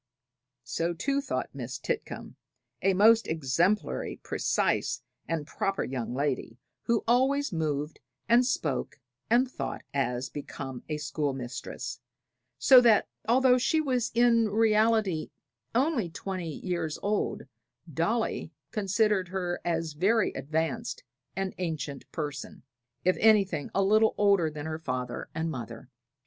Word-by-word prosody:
So, 165 Hz, +8 st, -2 dB
too, 275 Hz, +10 st, 0 dB
thought 130 Hz, -, -3 dB
Miss 130 Hz, -1 st, -5 dB
Titcome, -, -, -4 dB, 0.5 s
a 195 Hz, 0 st, +3 dB
most 225 Hz, +3 st, +6 dB
exemplary, 165 Hz, +7 st, 0 dB
precise -, -, 0 dB, 0.2 s
and 160 Hz, -3 st, -2 dB
proper 195 Hz, +5 st, -1 dB
young 125 Hz, -2 st, -4 dB
lady, 135 Hz, -4 st, -2 dB, 0.3 s
who 230 Hz, -2 st, +1 dB
always 265 Hz, +2 st, +2 dB
moved 150 Hz, -2 st, -2 dB, 0.3 s
and 235 Hz, +2 st, +6 dB
spoke 150 Hz, -, -2 dB, 0.3 s
and 245 Hz, +3 st, +4 dB
thought 255 Hz, -, -5 dB
as 125 Hz, -2 st, -1 dB
became 135 Hz, -3 st, -6 dB
a 155 Hz, -, -1 dB
schoolmistress, 135 Hz, -4 st, -4 dB, 0.6 s
so 260 Hz, -2 st, +8 dB
that, 230 Hz, -4 st, +4 dB, 0.2 s
although 255 Hz, +1 st, +5 dB
she 315 Hz, +6 st, +2 dB
was 255 Hz, -5 st, 0 dB
in 230 Hz, -2 st, +4 dB
reality 215 Hz, -5 st, +2 dB, 0.5 s
only 255 Hz, -, +2 dB
twenty 185 Hz, 0 st, -5 dB
years 165 Hz, -1 st, -3 dB
old, 205 Hz, +1 st, -1 dB, 0.5 s
Dolly -, -, -1 dB, 0.2 s
considered 210 Hz, -2 st, +1 dB
her 180 Hz, -1 st, -3 dB
as 165 Hz, -2 st, -1 dB
a 150 Hz, -, -20 dB
very 215 Hz, +4 st, +3 dB
advanced 160 Hz, -, -2 dB, 0.3 s
and 195 Hz, -1 st, -2 dB
ancient 155 Hz, -5 st, -4 dB
person 145 Hz, -3 st, -5 dB, 0.4 s
if 185 Hz, -, +3 dB
anything, 195 Hz, -9 st, +3 dB
a 195 Hz, -, +3 dB
little 215 Hz, +3 st, +4 dB
older 200 Hz, -5 st, +4 dB
than 150 Hz, -1 st, -7 dB
her 160 Hz, 0 st, -4 dB
father 125 Hz, -5 st, -4 dB
and 165 Hz, 0 st, -1 dB
mother. 120 Hz, -2 st, -7 dB
175 Hz, 125 wpm, -28 LUFS, 145-220 Hz, 0.6 s, so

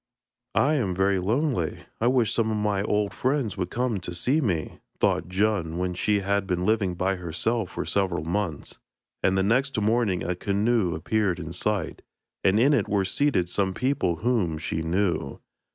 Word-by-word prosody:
'I 150 Hz, -, +3 dB
am 95 Hz, -9 st, -1 dB
very 95 Hz, +1 st, +2 dB
lonely: 110 Hz, -, -1 dB, 0.2 s
I 115 Hz, -, +2 dB
wish 120 Hz, -3 st, +2 dB
some 115 Hz, -1 st, +1 dB
of 110 Hz, -, -1 dB
my 105 Hz, -2 st, 0 dB
old 105 Hz, 0 st, 0 dB
friends 130 Hz, -6 st, 0 dB
would 90 Hz, -2 st, -3 dB
come 120 Hz, -4 st, -1 dB
to 90 Hz, -1 st, -6 dB
see 135 Hz, -, +2 dB
me,' 90 Hz, -, -2 dB, 0.2 s
thought 80 Hz, -, +1 dB
Djun 95 Hz, -4 st, 0 dB
when 90 Hz, 0 st, -1 dB
she 100 Hz, +3 st, +1 dB
had 100 Hz, 0 st, 0 dB
been 90 Hz, -1 st, -1 dB
living 105 Hz, -4 st, +1 dB
by 95 Hz, +2 st, 0 dB
herself 90 Hz, +5 st, -1 dB
for -, -, -4 dB
several 95 Hz, -5 st, 0 dB
months, 85 Hz, -2 st, -3 dB, 0.4 s
and 95 Hz, 0 st, +2 dB
the 95 Hz, -, +2 dB
next 125 Hz, +5 st, +1 dB
morning 110 Hz, -3 st, +1 dB
a 90 Hz, -, -1 dB
canoe 100 Hz, -1 st, +1 dB
appeared 95 Hz, +2 st, 0 dB
in 80 Hz, -1 st, -6 dB
sight, 100 Hz, -1 st, -1 dB, 0.4 s
and 95 Hz, +3 st, +4 dB
in 140 Hz, +5 st, +5 dB
it 120 Hz, -8 st, +1 dB
were 100 Hz, -1 st, +1 dB
seated 110 Hz, -3 st, +1 dB
some 95 Hz, +1 st, 0 dB
people 125 Hz, -10 st, 0 dB
whom 95 Hz, -5 st, 0 dB
she 80 Hz, +1 st, -3 dB
knew. 85 Hz, -4 st, -1 dB
100 Hz, 180 wpm, -26 LUFS, 90-115 Hz, 0.4 s, in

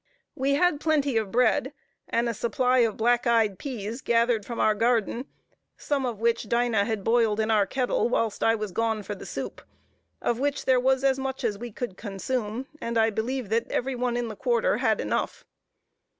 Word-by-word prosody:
We 275 Hz, +1 st, +1 dB
had 355 Hz, -1 st, +2 dB
plenty 290 Hz, -5 st, +1 dB
of 215 Hz, -3 st, -1 dB
bread, 250 Hz, +2 st, +2 dB, 0.4 s
and 235 Hz, +1 st, +1 dB
a 235 Hz, -, -1 dB
supply 250 Hz, +4 st, +1 dB
of 230 Hz, -3 st, +2 dB
black 240 Hz, +2 st, +2 dB
eyed 225 Hz, -5 st, +2 dB
peas, 235 Hz, -2 st, -5 dB
gathered 230 Hz, -3 st, +1 dB
from 235 Hz, -, -5 dB
our 215 Hz, -, +4 dB
garden, 235 Hz, +3 st, 0 dB, 0.5 s
some 275 Hz, -3 st, -1 dB
of 230 Hz, -4 st, -4 dB
which 230 Hz, -1 st, 0 dB
Dinah 235 Hz, -4 st, +2 dB
had 220 Hz, -3 st, -2 dB
boiled 225 Hz, -2 st, +2 dB
in 220 Hz, +1 st, +1 dB
our 205 Hz, -3 st, +3 dB
kettle, 250 Hz, -2 st, 0 dB
whilst 230 Hz, -3 st, 0 dB
I 225 Hz, -, +4 dB
was 215 Hz, -3 st, -4 dB
gone 225 Hz, +1 st, -1 dB
for 205 Hz, -, -5 dB
the 200 Hz, -, -9 dB
soup, -, -, -5 dB, 0.6 s
of 235 Hz, 0 st, -1 dB
which 285 Hz, 0 st, -1 dB
there 260 Hz, -1 st, +4 dB
was 265 Hz, +1 st, +2 dB
as 270 Hz, -1 st, +3 dB
much 265 Hz, 0 st, -4 dB
as 210 Hz, -4 st, -1 dB
we 240 Hz, 0 st, -6 dB
could 220 Hz, -4 st, -5 dB
consume, 220 Hz, +3 st, -3 dB, 0.2 s
and 230 Hz, 0 st, -2 dB
I 225 Hz, 0 st, +3 dB
believe 235 Hz, +1 st, -3 dB
that 230 Hz, +2 st, 0 dB
every 265 Hz, +2 st, -1 dB
one 245 Hz, -1 st, -1 dB
in 240 Hz, -1 st, -1 dB
the 220 Hz, -, -6 dB
quarter 475 Hz, -, +1 dB
had -, -, +1 dB
enough. -, -, -2 dB
235 Hz, 195 wpm, -26 LUFS, 220-255 Hz, 0.6 s, our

